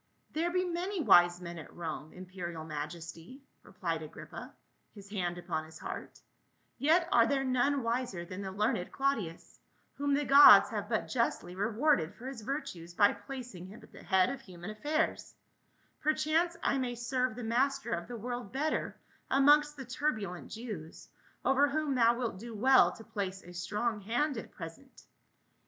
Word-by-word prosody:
"There 330 +3 0
be 365 +1 0
many 360 +3 -2
wise 175 - +6
men 170 -1 -7
at 160 - -11
Rome, 155 -2 -6
imperial 180 -3 -7
maj 150 0 -4
esty," 170 - -11 0.2
replied 165 -4 -4
Agrippa, 155 - -9 0.4
his 200 -1 -12
hand 175 -4 -2
upon 175 -3 -3
his 160 0 -12
heart, - - -7 0.6
"yet 330 +4 +3
are 230 -1 +5
there 275 -1 +1
none 260 +1 +1
wiser 230 -7 -2
than 185 +3 -7
the 190 -1 -5
learned 195 -2 -1
Claudius, 230 -12 -2 0.3
whom 285 0 0
the 290 +1 0
gods 275 -9 +9
have 210 -1 -4
but 220 -2 0
justly 230 -7 -1
rewarded 210 - +1
for 245 - -12
his 265 -3 -6
virtues 180 - -5
by 205 +1 +5
placing 205 -4 -8
him 205 +4 -12
at - - -17
the - - -13
head 190 -2 +3
of 275 - -6
human 180 -1 -9
affairs; 300 +9 -1 0.7
perchance 320 +3 +1
I 275 - +2
may 245 -2 -2
serve 250 0 -1
the 245 - -6
master 260 +2 0
of 170 -3 -3
the 240 0 -6
world 240 -1 -5
better 300 +4 -1 0.3
amongst 295 +2 +5
the 265 - -7
turbulent 220 -8 -3
Jews, 210 -9 -8 0.4
over 275 +2 +4
whom 300 -1 0
thou 235 -2 +4
wilt 235 -6 -3
do 230 +1 -8
well 260 +5 +5
to 225 - -12
place 190 -3 -4
a 175 - -12
strong 210 +5 -2
hand 245 +8 0
at 225 - -6
present." 170 +11 -11
230 Hz, 170 wpm, -32 LUFS, 180-275 Hz, 0.7 s, gods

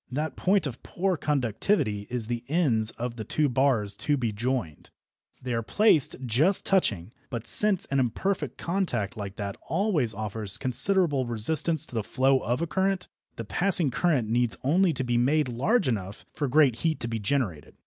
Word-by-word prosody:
That 150 +4 -3
point 190 -2 +1
of 130 -4 -6
poor 185 +1 -2
conductivity 125 - -1
is 125 -2 -3
the 120 +1 -4
ends 135 -9 +1
of 120 +1 -6
the 110 - -4
two 150 +7 0
bars 125 -6 +1
to 145 -1 0
be 120 -4 -1
joined. 110 - -3 0.5
They 125 -1 -3
are 115 - 0
placed 165 - +2
just 150 - +2
touching, 110 - 0 0.2
but 120 -2 -5
since 190 - +4
an 135 - +2
imperfect 160 - -2
contact 170 - -2
like 100 -3 -7
that 100 -1 -5
always 165 - -1
offers 105 -1 +1
considerable 140 +1 +1
resistance 150 +7 +1
to - - -14
the 115 - -1
flow 130 +4 +2
of 120 +8 -2
a - - +1
current, 190 +2 -1 0.3
the 115 - -6
passing 175 - +3
current 135 -4 +1
needs 120 0 0
only 175 +7 +3
to 130 -3 -3
be 120 -1 0
made 145 +4 +2
large 140 - +1
enough 105 -4 -4
for 145 - -2
great 135 -3 +3
heat 160 +2 -1
to 115 - -2
be 115 -1 -3
generated. 105 - -2
130 Hz, 180 wpm, -26 LUFS, 115-160 Hz, 0.5 s, since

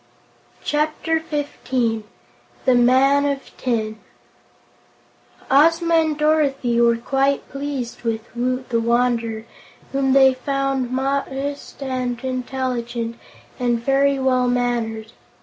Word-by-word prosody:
Chapter 310 +2 0
Fifteen 260 -7 -2 0.6
The 260 - +5
Man 260 +3 +4
of 280 -1 -3
Tin 220 -3 -2 1.5
Ozma 330 +4 +4
and 315 -2 +3
Dorothy 280 -6 +2
were 235 0 +4
quite 270 +3 0
pleased 275 -4 -4
with 225 -2 -1
Woot 255 +1 -2
the 230 - +1
Wanderer, 230 -1 0 0.5
whom 270 -1 +1
they 265 -1 +6
found 270 -1 -1
modest 275 +2 -3
and 255 -2 -2
intelligent 250 -2 -3 0.4
and 240 -2 +1
very 275 +3 +2
well 255 -1 +2
mannered. 235 -3 -1
260 Hz, 100 wpm, -21 LUFS, 240-275 Hz, 1.5 s, they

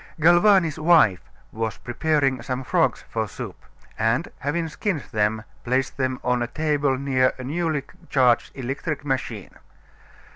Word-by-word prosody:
Galvani's 175 -1 +5
wife 155 - +4 0.2
was 110 -1 -3
preparing 135 0 0
some 130 +2 -3
frogs - - +1
for - - -2
soup, - - -7 0.4
and 115 +9 +1
having 165 +4 -1
skinned 160 -1 -2
them 110 0 0 0.2
placed 130 +2 0
them 130 -1 -1
on 125 0 +1
a 120 - 0
table 145 -1 0
near 130 -1 +2
a 130 - -7
newly 155 +1 -1 0.3
charged 125 -4 +3
electric 140 +3 -4
machine. 125 - -3
135 Hz, 135 wpm, -24 LUFS, 125-155 Hz, 0.4 s, Galvani's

